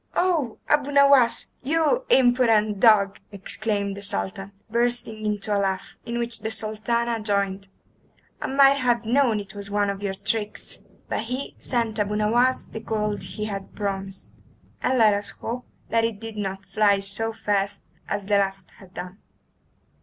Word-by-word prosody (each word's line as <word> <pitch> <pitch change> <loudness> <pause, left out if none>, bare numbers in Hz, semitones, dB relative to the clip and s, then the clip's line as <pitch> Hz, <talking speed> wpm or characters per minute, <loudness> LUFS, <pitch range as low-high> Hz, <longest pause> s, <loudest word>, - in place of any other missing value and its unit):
"Oh, 330 -10 +1
Abu 290 -1 +2
Nowas, 280 -4 +5
you 325 - +1
impudent 235 - +4
dog!" 200 -4 +5
exclaimed 200 0 -2
the 200 - -8
Sultan, 195 - -3 0.2
bursting 235 -1 0
into 210 0 -1
a - - +2
laugh, 190 -1 -2
in 235 0 -2
which 235 -1 -3
the 220 +1 -3
Sultana 225 +2 -1
joined. 200 -2 0 0.7
"I - - -2
might 275 +1 +5
have 240 -3 +1
known 240 -2 +3
it 200 -1 -9
was 200 -1 -8
one 205 0 +1
of 200 0 -7
your 195 -1 -2
tricks!" 210 +1 -2 0.3
But - - -2
he 255 +4 -4
sent 230 -3 -1
Abu 210 0 0
Nowas 240 +5 +2
the 220 - -8
gold 210 -1 -2
he 210 - -5
had 195 -2 -6
promised, 195 -2 -4 0.5
and 260 - +1
let 220 -3 +6
us 205 0 -1
hope 245 +2 -6 0.2
that 230 0 +2
it 225 -3 -1
did 225 -1 -7
not 195 -1 -4
fly 205 -2 +3
so 200 +3 -1
fast 205 -2 -1 0.3
as 205 -1 -2
the 205 0 +3
last 195 -2 -2
had 185 -2 -16
done. 180 +3 -7
215 Hz, 160 wpm, -24 LUFS, 200-235 Hz, 0.7 s, let